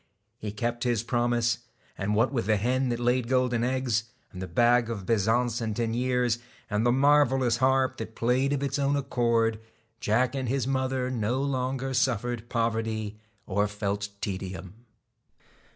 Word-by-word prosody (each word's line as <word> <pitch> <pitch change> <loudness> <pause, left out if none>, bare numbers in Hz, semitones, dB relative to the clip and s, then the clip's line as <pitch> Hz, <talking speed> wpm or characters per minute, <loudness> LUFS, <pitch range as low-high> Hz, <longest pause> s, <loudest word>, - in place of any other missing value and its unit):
He 105 - -4
kept 120 +3 -2
his 120 -3 +1
promise, 120 -1 +1 0.4
and 105 +1 -1
what 120 +6 +2
with 115 -6 -1
the 110 -1 +3
hen 125 +5 +1
that 120 -1 -1
laid 120 0 +1
golden 125 -2 +1
eggs, 125 -3 0 0.3
and 90 -3 -8
the 95 - -4
bags 120 +6 +3
of 105 -5 -4
bezants 115 +2 +1
and 110 -2 -2
deniers, 120 +1 0 0.3
and 105 +1 +1
the 120 - +4
marvellous 135 -3 +4
harp 130 +1 +2
that 110 0 -7
played 125 +4 +1
of 140 -1 0
its 140 0 -1
own 140 0 +2
accord, 115 -5 +1 0.4
Jack 120 +4 +1
and 130 -3 -2
his 130 -1 0
mother 130 -1 -1
no 120 +1 0
longer 130 -1 -1
suffered 120 -2 0
poverty 110 -2 -1 0.3
or 105 +1 +1
felt 105 0 -3
tedium. 95 -2 -5
120 Hz, 155 wpm, -27 LUFS, 110-130 Hz, 0.4 s, the